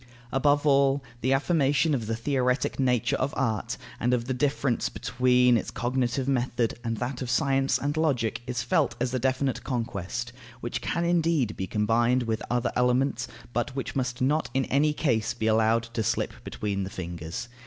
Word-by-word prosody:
Above 145 +2 +2
all, 140 -1 +4 0.2
the 130 - +1
affirmation 145 +1 +2
of 115 -6 -1
the 115 - -1
theoretic 125 +2 0
nature 125 -4 +2
of 135 +2 -2
art, 110 -6 -1 0.2
and 125 +1 +2
of 120 -1 -3
the 130 - -1
difference 135 -1 0
between 125 -1 +3
its - - -3
cognitive 125 +3 -1
method 125 -3 0
and 115 -1 -2
that 125 +2 -3
of 125 - -3
science 135 +1 +2
and 145 +2 -2
of 155 - +1
logic, 120 -9 0
is 120 -2 -2
felt - - +1
as 125 +1 -1
a 130 - +1
definite 130 +1 0
conquest, 120 0 -3 0.3
which 120 0 -4
can 170 0 -1
indeed 165 -9 +1
be 95 - -4
combined 115 +4 +2
with 110 -2 -2
other 120 0 0
elements, 125 0 +1 0.3
but 120 +3 -1
which 135 - -4
must 125 -2 -2
not 150 +5 +1
in 135 -1 +2
any 150 +3 +2
case 120 -7 0
be 110 - -3
allowed 110 +1 +3
to 115 0 -4
slip 110 - 0
between 100 -2 -3
the 95 - -4
fingers. 85 +3 -6
125 Hz, 180 wpm, -27 LUFS, 115-135 Hz, 0.3 s, all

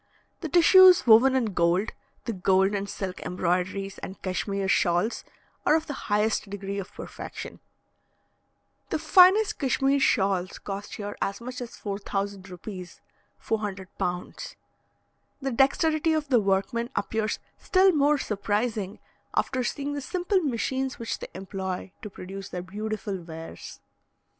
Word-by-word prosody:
The 320 - -5
tissues 360 +1 +7
woven 245 +3 +7
in 230 -6 0
gold, 175 +4 +2 0.3
the 230 - -2
gold 190 +1 +2
and 200 0 -2
silk 190 -2 -5
embroideries 185 +2 -2
and 190 - -8
Cashmere 195 +1 -2
shawls, 180 +3 +1 0.4
are - - +4
of 320 0 0
the 290 - -5 0.2
highest 210 0 +1
degree 200 0 -4
of 190 - -7
perfection. - - -8 1.3
The - - 0
finest 385 +3 +5
Cashmere 275 0 +2
shawls 195 -8 +1
cost 200 0 -6
here 205 -1 -5
as 195 - -1
much 250 +1 -7
as 240 - -7
4,000 200 -1 -4
rupees 180 0 -9 0.4
(400 200 -4 -4
pounds). 180 0 -4 0.8
The 270 -1 -2
dexterity 310 +5 +2
of 305 -2 -1
the 250 -4 +5
workmen 200 +4 0
appears 220 -1 -1 0.2
still 380 0 +4
more 295 -2 +3
surprising 210 -2 -2 0.4
after 260 -2 0
seeing 285 +3 -3
the 290 - -3
simple 365 +7 0
machines 265 -1 -1
which 230 -2 -4
they - - -6
employ 190 -1 -5
to 210 - -6
produce 195 0 -8
their 180 -1 -5
beautiful 205 0 -4
wares. 165 -1 -9
210 Hz, 135 wpm, -26 LUFS, 190-265 Hz, 1.3 s, tissues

